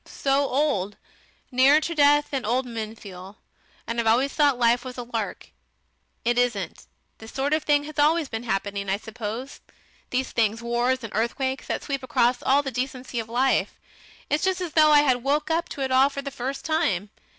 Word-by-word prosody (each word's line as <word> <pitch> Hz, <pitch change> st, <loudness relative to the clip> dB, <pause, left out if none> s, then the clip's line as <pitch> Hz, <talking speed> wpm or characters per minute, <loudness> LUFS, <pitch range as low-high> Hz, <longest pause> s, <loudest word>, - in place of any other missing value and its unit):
So 275 Hz, 0 st, 0 dB
old! 250 Hz, -8 st, 0 dB, 0.5 s
Nearer 265 Hz, +4 st, +5 dB
to 335 Hz, -, -3 dB
death 290 Hz, -1 st, +4 dB
than 270 Hz, -3 st, -2 dB
old 250 Hz, +4 st, 0 dB
men 225 Hz, -2 st, -5 dB
feel. 195 Hz, -1 st, -11 dB, 0.5 s
And 230 Hz, +1 st, -3 dB
I've 230 Hz, -, 0 dB
always 255 Hz, +5 st, +3 dB
thought 290 Hz, -4 st, +3 dB
life 240 Hz, 0 st, +3 dB
was 255 Hz, -1 st, -8 dB
a 245 Hz, -, -4 dB
lark. 230 Hz, -3 st, -5 dB, 0.7 s
It 240 Hz, +1 st, +2 dB
isn't.... 210 Hz, -8 st, -2 dB, 0.3 s
This 220 Hz, 0 st, -11 dB
sort 275 Hz, +2 st, -1 dB
of 310 Hz, -, +2 dB
thing 290 Hz, -1 st, +2 dB
has 300 Hz, 0 st, -7 dB
always 310 Hz, +1 st, +3 dB
been 225 Hz, -3 st, -5 dB
happening, 200 Hz, -3 st, -3 dB
I 195 Hz, -, +1 dB
suppose 225 Hz, +4 st, -7 dB, 0.5 s
these 255 Hz, +1 st, -1 dB
things, 225 Hz, -1 st, +1 dB
wars 240 Hz, +2 st, 0 dB
and 225 Hz, -, -7 dB
earthquakes, 260 Hz, +4 st, -1 dB
that -, -, -3 dB
sweep 275 Hz, -3 st, -3 dB
across 245 Hz, 0 st, +1 dB
all 280 Hz, +2 st, +3 dB
the 270 Hz, -, -4 dB
decency 255 Hz, 0 st, -4 dB
of 225 Hz, 0 st, -5 dB
life. 255 Hz, +3 st, +1 dB, 0.5 s
It's 300 Hz, -, 0 dB
just 375 Hz, -1 st, +1 dB
as 355 Hz, -3 st, -4 dB
though 310 Hz, -1 st, +5 dB
I 295 Hz, -1 st, +7 dB
had 260 Hz, -4 st, +2 dB
woke 290 Hz, +5 st, 0 dB
up 335 Hz, +1 st, 0 dB
to 280 Hz, -, -6 dB
it 265 Hz, -1 st, -1 dB
all 260 Hz, +2 st, +5 dB
for 280 Hz, 0 st, -6 dB
the 280 Hz, -, -5 dB
first 265 Hz, +1 st, -5 dB
time. 225 Hz, -, 0 dB
255 Hz, 195 wpm, -25 LUFS, 230-285 Hz, 0.7 s, I